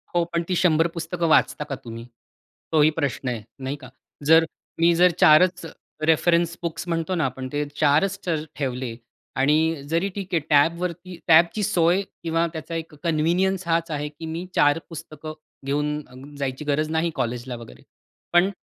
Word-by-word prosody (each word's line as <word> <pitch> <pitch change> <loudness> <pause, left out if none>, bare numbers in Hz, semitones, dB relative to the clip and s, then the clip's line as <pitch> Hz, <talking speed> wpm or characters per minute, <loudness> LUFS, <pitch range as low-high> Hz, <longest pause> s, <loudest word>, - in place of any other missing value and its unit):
हो 175 - +4
पण 170 0 +1
ती 180 - +1
100 165 -2 +3
पुस्तकं 170 +1 -2
वाचता 150 - +3
का 135 - -2
तुम्ही, 115 -2 -9 0.7
तोही 155 -1 +5
प्रश्न 135 -2 -1
आहे. 115 -3 -4 0.2
नाही 135 +2 -3
का. 130 - -10 0.4
जर 165 0 +7 0.3
मी 170 +1 +5
जर 180 0 +6
4च 175 +3 +5 0.4
रेफरन्स 170 +1 +3
बुक्स 170 +1 -4
म्हणतो 165 +2 -1
ना, 165 - +1
आपण 130 0 -4
ते 145 0 0
4च 155 +8 +2 0.4
ठेवले 130 -4 -3 0.5
आणि 145 +3 +4 0.3
जरी 170 +4 +1
ठीक 195 -3 -6
आहे, 170 - +4
टॅबवरती 170 +4 +1
टॅबची 170 +6 +5
सोय 180 -2 +3 0.2
किंवा 165 0 +1
त्याचा 165 +1 -6
एक 165 -1 -5
कन्व्हिनियन्स 175 +3 +1
हाच 165 0 0
आहे, 150 0 -3
की 150 +2 -10
मी 170 +2 -4
4 145 +2 +4
पुस्तकं 155 -1 -8 0.3
घेऊन 145 -1 -3
जायची 135 +1 -3
गरज 150 +1 0
नाही 160 +1 +1
कॉलेजला 120 +1 -3
वगैरे. 115 - -12 0.5
पण 175 +3 +5
160 Hz, 160 wpm, -24 LUFS, 145-170 Hz, 0.7 s, जर